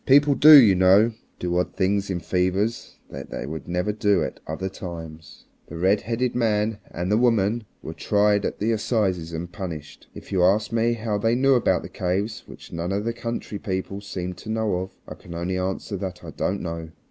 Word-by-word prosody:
People 145 +1 +6
do, 150 +1 +10
you 110 -7 +6
know, 95 +5 +5 0.3
do 90 -1 -2
odd 90 - -2
things 100 +1 0
in 90 -2 -1
fevers 95 +6 -1
that - - -8
they - - -5
would 80 +3 -7
never 90 +3 -1
do 105 -1 +2
at - - -5
other 80 +5 -3
times. 80 -5 -9 0.2
The 85 - -9
redheaded 110 +7 +1
man 110 -2 0
and 90 +3 -3
the 105 - +4
woman 115 -2 +2 0.2
were - - -6
tried 105 0 +2
at - - -2
the 110 +3 0
assizes 100 -7 0
and 85 +2 -5
punished. 80 -5 -7
If - - -11
you 95 -2 +2
ask 105 +4 +3
me 115 +1 +2
how 110 -2 -2
they 115 +3 +2
knew 135 +2 +4
about 125 - +2
the - - -6
caves 100 +5 -2
which - - -12
none 85 +2 -3
of 100 +2 -1
the 115 - -1
country 115 -3 -5
people 100 -1 -4
seemed 90 -3 -5
to 110 - -10
know 110 -4 0
of, 95 +1 -6
I - - -6
can 85 - -11
only 90 +2 -2
answer 95 +2 -3
that 90 -1 -6
I 80 - -8
don't 95 +7 -2
know. 85 -1 -5
100 Hz, 205 wpm, -24 LUFS, 90-110 Hz, 0.3 s, do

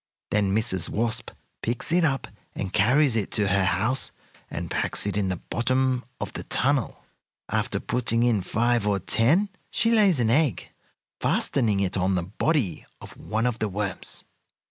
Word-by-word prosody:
Then 100 -2 +2
Mrs. 110 -5 +2
Wasp 115 0 -2 0.3
picks 120 +6 -3
it 175 +1 +3
up 135 -4 0 0.3
and 95 -2 -4
carries 125 +5 +4
it 105 -4 -1
to 105 -2 +1
her 100 0 +3
house, 105 +9 0 0.4
and - - -5
packs - - 0
it 100 - -2
in 100 -2 0
the 95 - -1
bottom 130 +5 0
of - - -5
the - - -5
tunnel. 135 -2 0 0.5
"After - - -1
putting 120 -1 +1
in 115 -5 +2
five 115 +3 +1
or 100 -1 +2
ten 135 - +2 0.2
she 230 - +1
lays 205 - +4
an 115 -2 +2
egg, 145 0 +1 0.5
fastening 110 -7 +1
it 95 0 0
on 95 +1 +1
the 90 - 0
body 105 - -1
of - - -11
one 110 +2 -2
of 120 -1 -1
the 110 - -1
worms. 100 0 -4
115 Hz, 165 wpm, -25 LUFS, 100-130 Hz, 0.5 s, carries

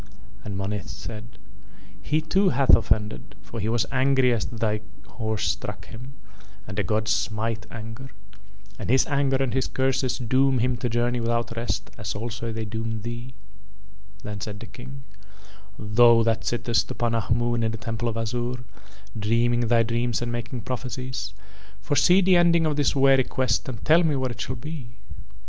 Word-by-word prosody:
And 100 -2 -5
Monith 100 +1 -3
said: 115 +1 -8 0.6
"He 150 +10 0
too 190 +5 +2
hath 135 +1 +6
offended, 105 -3 -1
for 105 +5 -7
he 105 +1 -1
was 115 -1 +1
angry 130 -1 +3
as 115 - -1
thy 110 -2 -1 0.2
horse 110 -3 -1
struck - - -6
him, 125 +4 -10 0.5
and - - -7
the 105 - +1
gods 110 +3 0
smite 110 +1 -1
anger. 115 +4 -8 0.7
And - - -5
his 130 +2 +4
anger 140 -2 +1
and 130 -2 0
his 130 0 +1
curses 130 -1 0
doom 130 +2 +2
him 125 +1 +1
to 120 - -2
journey 120 +1 +1
without 115 0 -1
rest 115 +1 -3
as - - -4
also 115 +1 -4
they 110 0 -4
doom 110 0 -4
thee." 120 +2 -6 0.9
Then 105 -1 -6
said 100 0 -5
the 115 - -8
King: 130 +3 -10 0.7
"Thou 115 +2 +5
that 115 -1 0
sittest 120 -1 0
upon 120 -1 -1
Ahmoon 120 +1 +1
in 110 - +1
the 110 - -4
Temple 115 +1 -3
of 115 - -3
Azure, 120 +2 -2 0.5
dreaming 115 +2 +2
thy 115 0 +4
dreams 115 0 0
and 120 0 -3
making 120 +1 -4
prophecies, 125 -4 -4 0.4
foresee 145 - +4
the 185 -1 +5
ending 170 -1 +4
of 155 -1 +1
this 145 0 +1
weary 135 -1 +5
quest 130 0 0
and 115 -5 -7
tell 160 +3 +6
me 155 -3 +2
where 130 -2 -1
it 120 - -7
shall 130 0 -3
be?" 125 -2 -8
120 Hz, 170 wpm, -25 LUFS, 110-130 Hz, 0.9 s, hath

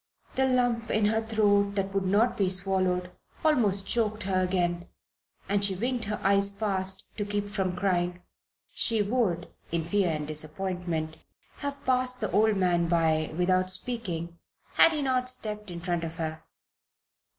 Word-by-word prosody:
The 265 0 +2
lump 245 -3 +1
in 215 -1 +2
her 220 +1 +2
throat 205 -2 +2
that 195 -1 -1
would 195 -1 0
not 210 +6 +3
be 195 -2 +1
swallowed 185 -1 0 0.3
almost 205 -10 +3
choked 215 -2 0
her 185 -1 +1
again, 175 -1 0 0.6
and 200 +1 +1
she 195 -1 +3
winked 240 +3 -2
her 210 +1 -3
eyes 200 0 +4
fast 190 -3 -2
to 205 - -1
keep 205 0 -2
from 190 -3 -2
crying. 180 -1 -1 0.5
She 225 -3 +3
would, 200 -6 0 0.2
in 165 0 0
her 165 - -10
fear 200 -2 +2
and 155 -2 -2
disappointment, 160 +1 -3 0.4
have 285 0 -5
passed 255 0 +1
the 215 - -2
old 215 -1 +3
man 175 -2 +2
by 160 -2 +1
without 185 +1 +2
speaking 185 -5 -3 0.3
had 330 - +6
he 300 -2 -1
not 255 -1 +1
stepped 210 -5 -3
in 170 -1 -6
front 175 -1 -1
of 165 0 -5
her. 160 -2 -5
195 Hz, 160 wpm, -28 LUFS, 175-220 Hz, 0.6 s, had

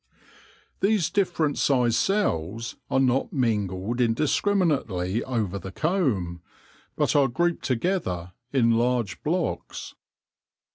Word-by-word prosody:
These 200 -4 +2
differ 180 -5 +1
ent 145 - -2
sized 125 -4 +3
cells 115 - 0
are 130 - +2
not 130 0 +2
mingled 110 -2 -1
indiscriminately 120 - +1
over 110 -7 -2
the 95 - -8
comb, 110 - 0 0.5
but - - +1
are 140 -2 +5
grouped 170 +7 0
together 115 - -1 0.2
in 120 -4 +3
large 115 -3 0
blocks. 175 +3 -3
125 Hz, 105 wpm, -25 LUFS, 100-160 Hz, 0.5 s, are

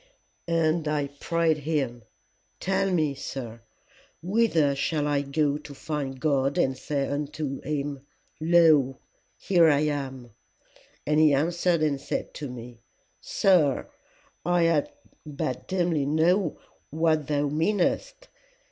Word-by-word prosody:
"'And 165 -1 +1
I 145 -2 -1
prayed 165 -2 +1
him, 140 -5 -2 0.6
Tell 195 +1 0
me, 155 -6 +1
sir, 120 -4 -7 0.6
whither 175 -8 +2
shall 150 +2 -1
I 145 -1 +1
go 145 +1 0
to 145 -1 -11
find 140 -3 -4
God 140 -1 +1
and 135 -7 +2
say 140 +1 -2
unto 145 -1 -4
him, 145 -2 -3 0.4
Lo, 155 -5 +4 0.4
here 170 -4 +4
I 145 -1 +3
am! 135 -5 -3 0.7
And 150 +1 +2
he 155 -2 +5
answered 170 +2 +1
and 140 -3 0
said - - -4
to 145 -3 -6
me, 120 -1 -10 0.4
Sir, 165 -9 +2 0.5
I 170 -3 +2 0.4
but 140 -4 -4
dimly 170 -6 0
know 165 +3 +2 0.3
what 155 -1 +1
thou 145 -1 0
meanest. 190 - -1
150 Hz, 120 wpm, -26 LUFS, 140-165 Hz, 0.7 s, he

